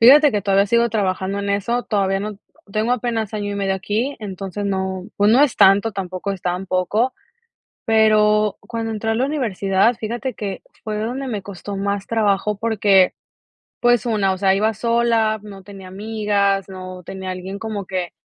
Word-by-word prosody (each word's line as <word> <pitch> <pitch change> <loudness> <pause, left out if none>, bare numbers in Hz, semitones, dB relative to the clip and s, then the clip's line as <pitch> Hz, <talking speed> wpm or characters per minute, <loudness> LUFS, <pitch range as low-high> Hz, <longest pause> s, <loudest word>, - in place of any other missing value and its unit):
Fíjate 285 +5 +8
que 205 -2 0
todavía 195 0 +3
sigo 235 +2 +3
trabajando 195 -2 -1
en 200 - -2
eso, 220 +5 0
todavía 195 -2 +1
n 205 0 -5 0.3
tengo 220 +3 +1
apenas 225 -3 -2
año 205 -1 -3
y - - -4
medio 195 -1 0
aquí, 215 +8 -2
entonces 195 0 -5
no, 190 0 -2
pues, 205 +1 +4
no 260 +5 +6
es 285 - +2
tanto, 200 +3 +5
tampoco 185 0 -4
es 190 - -7
tan 180 +2 -2
poco, 205 +7 +1 0.7
pero 215 -1 +3
cuando 225 -1 -4
entré 225 +1 -2
a - - +1
la 250 - +1
universidad 225 -6 +1
fíjate 240 +3 -3
que 200 -3 -5 0.2
fue 215 -2 -3
donde 255 +5 -3
me 210 -5 -3
costó 200 +1 -7
más 200 0 -2
trabajo 210 -2 +1
porque, 205 -4 +3 0.7
pues, 240 -2 +3
una, 205 -4 +1
o 190 - -4
sea, 190 0 +3
iba 215 +2 +1
sola, 230 -1 +1
no 200 -2 -10
tenía 195 -1 -11
amigas, 200 -1 0
no 185 -1 -8
tenía 190 0 -6
alguien 185 +2 -6
como 210 -4 -5
que, 185 -2 -3
205 Hz, 175 wpm, -20 LUFS, 195-225 Hz, 0.7 s, Fíjate